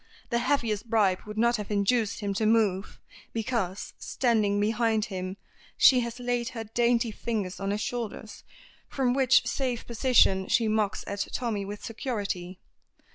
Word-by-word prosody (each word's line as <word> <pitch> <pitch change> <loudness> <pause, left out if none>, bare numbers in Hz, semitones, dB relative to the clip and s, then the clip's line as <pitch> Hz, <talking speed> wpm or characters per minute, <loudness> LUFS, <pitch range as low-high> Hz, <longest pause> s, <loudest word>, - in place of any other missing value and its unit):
The 235 - +2
heaviest 235 -4 0
bribe 200 -5 +3
would 210 0 -7
not 235 +1 +3
have 210 -1 -6
induced 210 +2 +1
him 200 -1 -1
to 215 +2 0
move, 210 -3 +1 0.3
because, 220 -5 -2
standing 215 -5 +1
behind 220 0 +1
him, 185 -1 -5 0.4
she 255 - +7
has 235 0 -4
laid 245 -1 -1
her 225 - -3
dainty 235 +1 +1
fingers 210 -4 -3
on 195 0 -2
his 205 +1 -1
shoulders, 220 -3 -5 0.5
from 255 -3 +1
which 260 -2 +4
safe 245 0 -2
position 225 -6 +3
she 230 -2 +2
mocks 215 -1 0
at 200 0 -3
Tommy 220 -5 -2
with 205 +1 -7
security. 200 -6 -4
220 Hz, 150 wpm, -27 LUFS, 205-235 Hz, 0.5 s, she